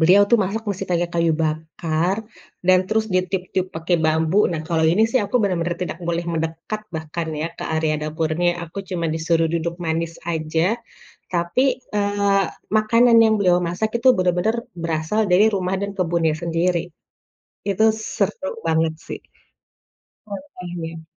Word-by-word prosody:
Beliau 185 +5 +6
tuh 235 - +7
masak 205 +2 -1
masih 195 0 -3
pakai 175 0 +1
kayu 170 -1 +3
bakar 160 +4 -1 0.4
dan 185 0 +6
terus 220 +1 +1
ditiup-tiup 185 0 0
pakai 170 +2 +1
bambu, 160 +4 +2
nah 160 - -2
kalau 160 -1 +2
ini 175 +7 +4
sih 260 - +3
aku 225 - -9
benar-benar 175 -3 0
tidak 175 -1 -4
boleh 170 0 0
mendekat 165 +6 -3
bahkan 160 +1 -4
ya, 160 - 0
ke - - -4
area 160 -1 +1
dapurnya, 160 +2 0
aku 170 +3 -8
cuma 175 -3 -2
disuruh 165 0 +1
duduk 170 0 -1
manis 165 +1 -1
aja. 160 +5 0 0.6
Tapi, 175 +8 +1 0.3
eee, 200 -1 +2 0.3
makanan 230 +2 +5
yang 220 0 +4
beliau 180 -3 +4
masak 180 +6 -2
itu 260 - +4
benar-benar 180 +5 +1 0.3
berasal 165 +5 0
dari 190 +5 +6
rumah 185 -1 -1
dan 200 0 -2
kebunnya 165 -3 +1
sendiri, 170 +1 0 0.8
itu 200 +2 +1
seru 220 - -2 0.2
banget 160 0 +2
sih. - - -5 1.1
Oke, 240 -2 -8 0.2
deh. 165 0 -7
175 Hz, 145 wpm, -22 LUFS, 160-200 Hz, 1.1 s, tuh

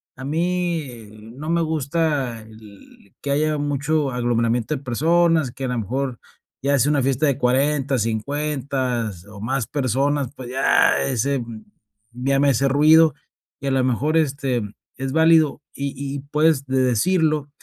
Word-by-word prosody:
a 130 - -8
mí, 175 +2 -1
eh, 120 -6 -11 0.3
no 155 +3 -6
me 170 0 +2
gusta 150 -5 -1
el 110 -2 -17
que 140 - -3
haya 150 +1 +1
mucho 145 0 -1
aglomeramiento 120 +2 0
de 135 - -7
personas, 160 +2 +2
que 130 +2 -6
a - - -1
la 125 - -2
mejor 125 +3 -3 0.4
ya 140 +1 +2
sea 145 +4 +3
una 145 -3 +1
fiesta 135 +3 +1
de 135 -2 +1
40, 135 +1 +1
50, 130 0 -2 0.2
o 105 - -11
más 125 +3 -2
personas, 140 0 0
pues, 125 -2 -8
ya 135 +1 +3
ese, 135 +2 0
mm, 115 -2 -8 0.5
ya 135 +3 0
me 140 0 +4
hace 135 +1 +2
ruido, 155 +3 +5 0.5
y 140 - -4
a - - +1
lo 130 -1 +2
mejor, 140 +6 +1
este, 135 -5 0 0.4
es 135 0 -3
válido 160 -2 +4
y 140 0 -4
y 140 +1 -5
puedes 150 -2 +2
de 130 -1 0
decirlo. 150 - +1
135 Hz, 160 wpm, -22 LUFS, 125-150 Hz, 0.5 s, ruido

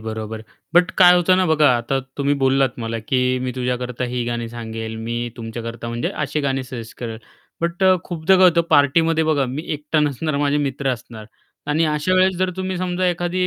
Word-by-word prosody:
बरोबर. 110 0 -6 0.3
बट 175 +1 +5
काय 180 -1 +8
होतं 180 +1 +3
ना, 185 - +2
बघा 155 -2 +4
आता 120 +3 -1 0.2
तुम्ही 140 0 +1
बोललात 135 -1 +2
मला, 115 -1 -3
की 130 -1 +1
"मी 125 0 -3
तुझ्याकरता 125 0 -2
ही 125 -1 -1
गाणी 120 -1 -3
सांगेल, 110 -1 -6
मी 115 +1 -4 0.2
तुमच्याकरता, 115 0 -6
म्हणजे 120 0 -2 0.2
असे 150 +1 -2
गाणे 135 -2 -1
सजेस्ट 125 -3 -9
करेल." 115 -2 -5 0.4
बट 170 +2 -2
अ, 185 - +6
खूपदा 175 +2 +2
काय 185 - +5
होतं, 170 -1 +3
पार्टीमध्ये 160 +3 +3
बघा, 155 -3 +2
मी 135 +5 -4
एकटा 150 +1 -1
नसणार, 150 +1 -1
माझे 145 0 +1
मित्र 140 -1 -1
असणार. 115 -3 -9 0.4
आणि 150 +3 +1
अशा 150 +4 0
वेळेस 185 0 +3
जर 185 +1 0
तुम्ही 190 0 -3
समजा 180 0 -1
एखादी 175 +1 -1
140 Hz, 190 wpm, -21 LUFS, 120-165 Hz, 0.4 s, काय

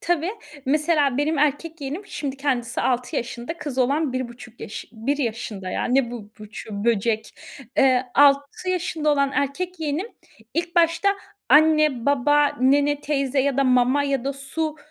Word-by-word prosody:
Tabii. 345 0 0 0.4
Mesela, 295 -2 +2
benim 300 +1 +1
erkek 300 +3 0
yeğenim, 285 +7 -4
şimdi 275 -2 -5
kendisi 255 -4 -1
6 250 -1 -1
yaşında, 240 +6 -4
kız 280 -5 -5
olan 280 +3 +1
1,5 240 -2 -6
yaş 205 - -6
1 240 +6 -1
yaşında, 220 -7 -4
ya. - - -2
Ne 250 -1 +2
bu, 220 -4 -8
buçuğu, 210 0 -7
böcek. 220 -1 0 0.4
Eee, 255 -1 +4
6 285 +5 +3
yaşında 335 -4 0
olan 280 -1 +1
erkek 330 +6 -2
yeğenim 310 +5 -2 0.5
ilk 340 +2 -2
başta 335 +3 +3 0.4
anne, 305 -3 +4
baba, 290 +1 +4
nene, 285 +2 +3
teyze 275 -2 0
ya 275 -1 0
da 275 - +3
mama 255 +2 +3
ya 275 -3 -1
da 275 - -1
su, 300 +3 -4
275 Hz, 155 wpm, -23 LUFS, 250-300 Hz, 0.5 s, Eee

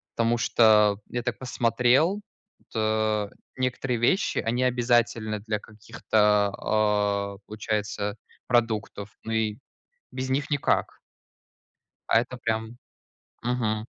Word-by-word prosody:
потому 115 +1 +2
что 105 -3 +4
я 120 -1 -3
так 120 -1 -2
посмотрел, 125 - +2 0.4
вот, - - -24
э, 110 -1 +1 0.3
некоторые 130 -1 -1
вещи, 180 - +2
они 120 +3 0
обязательны 120 -3 +1
для 105 0 -3
каких-то, 105 -1 +1
а, 105 -2 0
получается, 105 -1 -3 0.3
продуктов, 110 -3 -1
ну 115 - -5
и 110 -1 0 0.5
без 130 0 -4
них 145 +3 -1
никак. 145 -1 0 1.1
А 115 - +6
это 125 +1 -7
прям 110 0 -3 0.7
Мгм. 115 -3 -1
110 Hz, 105 wpm, -26 LUFS, 105-120 Hz, 1.1 s, А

